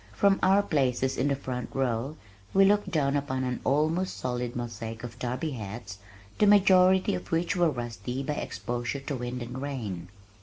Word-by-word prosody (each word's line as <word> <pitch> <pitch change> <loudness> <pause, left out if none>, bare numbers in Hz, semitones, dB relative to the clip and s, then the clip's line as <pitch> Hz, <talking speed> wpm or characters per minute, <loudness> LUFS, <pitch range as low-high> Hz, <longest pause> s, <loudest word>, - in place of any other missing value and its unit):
From 200 -1 +3
our 195 +2 +5
places 130 -5 +1
in 140 - +1
the 140 - +2
front 125 -2 -5
row 130 +3 -1 0.4
we 195 0 +7
looked 205 +1 +3
down 145 -3 +1
upon 130 -2 -1
an 125 -1 -2
almost 155 +6 +1
solid 125 -1 -3
mosaic 115 -1 -5
of 120 -1 -8
derby 125 +6 -2
hats, 105 -4 -7 0.4
the 210 - +5
majority 190 0 +5
of 180 - -5
which 170 +2 +1
were 175 -2 +3
rusty 120 -1 -4
by 150 - -1
exposure 120 -1 -3
to 140 +1 -4
wind 125 0 -4
and 125 +2 -6
rain. 115 -12 -4
130 Hz, 175 wpm, -28 LUFS, 120-165 Hz, 0.4 s, we